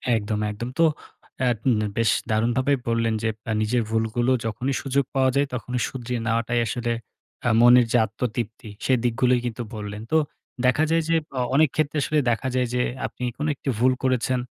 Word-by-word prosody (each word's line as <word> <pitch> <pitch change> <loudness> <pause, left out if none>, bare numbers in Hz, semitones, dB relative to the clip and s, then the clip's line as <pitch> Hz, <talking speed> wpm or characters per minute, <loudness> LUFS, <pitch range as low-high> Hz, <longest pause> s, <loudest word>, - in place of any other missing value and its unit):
একদম, 105 -1 -1
একদম। 115 +4 -5
তো - - +6 0.6
এ্যাঁ 125 -2 +2
এন 120 -4 +3 0.2
বেশ 115 -1 +3 0.2
দারুণভাবে 120 +5 +2
বললেন 115 -1 +1
যে, 110 - +2 0.2
এ্যাঁ 110 - -1
নিজের 115 +3 +1
ভুলগুলো 115 +2 +1
যখনই 125 +5 -2
সুযোগ 140 0 +1
পাওয়া 130 -1 +4
যায় 140 +1 +2
তখনই 125 0 -3
শুধিয়ে 125 -1 -4
নেওয়াটাই 115 +1 +1
আসলে, 120 +2 -2 0.5
এ্যাঁ 115 - +2
মনের 120 0 +7
যে - - +4
আত্মতৃপ্তি। 110 +1 -4 0.2
সে 130 - +3
দিকগুলোই 125 +1 +2
কিন্তু 120 0 -3
বললেন। 105 0 -6
তো 160 - +5 0.5
দেখা 130 +5 +3
যায় 165 0 +3
যে 165 - +3 0.2
অ - - +1 0.2
অনেক 155 0 +5
ক্ষেত্রে 155 -1 0
আসলে 155 - 0
দেখা 120 +3 -1
যায় 125 -1 +2
যে 125 - +1 0.3
আপনি - - -9
কোন 150 - -2
একটি 135 - -5
ভুল 130 +2 +4
করেছেন 130 0 +1
120 Hz, 180 wpm, -24 LUFS, 115-130 Hz, 0.6 s, মনের